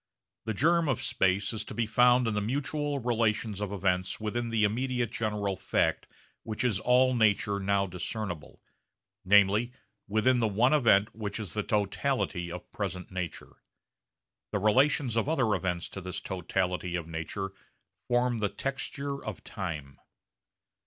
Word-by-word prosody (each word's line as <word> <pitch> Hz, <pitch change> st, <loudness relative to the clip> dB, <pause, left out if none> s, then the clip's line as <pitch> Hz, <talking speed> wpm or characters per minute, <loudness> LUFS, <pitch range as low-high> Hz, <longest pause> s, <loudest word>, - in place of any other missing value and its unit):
The 110 Hz, -1 st, -2 dB
germ 165 Hz, +5 st, +3 dB
of 130 Hz, 0 st, 0 dB
space 100 Hz, -4 st, +1 dB
is 110 Hz, -1 st, -3 dB
to -, -, -8 dB
be 120 Hz, -, +1 dB
found 125 Hz, +2 st, +4 dB
in 115 Hz, -, 0 dB
the 105 Hz, -, 0 dB
mutual 145 Hz, +5 st, -1 dB
relations 110 Hz, -4 st, 0 dB
of 105 Hz, -1 st, -2 dB
events 90 Hz, -2 st, 0 dB
within 115 Hz, +2 st, -2 dB
the 115 Hz, -1 st, +1 dB
immediate 120 Hz, +2 st, 0 dB
general 105 Hz, -5 st, -1 dB
fact -, -, 0 dB, 0.3 s
which 110 Hz, +1 st, -3 dB
is 110 Hz, -6 st, +1 dB
all 130 Hz, +2 st, +4 dB
nature 105 Hz, -3 st, +2 dB
now 100 Hz, 0 st, +1 dB
discernible, 90 Hz, -1 st, -5 dB, 0.6 s
namely 100 Hz, +5 st, +4 dB, 0.3 s
within 110 Hz, +5 st, +3 dB
the 115 Hz, -, +2 dB
one 115 Hz, +7 st, +3 dB
event 110 Hz, -8 st, +4 dB
which 105 Hz, -1 st, -4 dB
is 105 Hz, -4 st, -6 dB
the 105 Hz, -, 0 dB
totality 105 Hz, -3 st, -1 dB
of 90 Hz, 0 st, -8 dB
present 90 Hz, 0 st, -4 dB
nature. 90 Hz, -2 st, -6 dB, 0.9 s
The 105 Hz, -, 0 dB
relations 125 Hz, +4 st, +3 dB
of 115 Hz, +5 st, +1 dB
other 130 Hz, -9 st, +2 dB
events 90 Hz, -2 st, -1 dB
to 95 Hz, -, -7 dB
this 90 Hz, 0 st, -4 dB
totality 90 Hz, -1 st, -2 dB
of 85 Hz, -2 st, -3 dB
nature 85 Hz, +4 st, -4 dB, 0.6 s
form 120 Hz, -1 st, +2 dB
the 105 Hz, -1 st, +1 dB
texture 140 Hz, +2 st, -4 dB
of -, -, -6 dB
time. 80 Hz, -, -6 dB
110 Hz, 150 wpm, -29 LUFS, 95-125 Hz, 0.9 s, found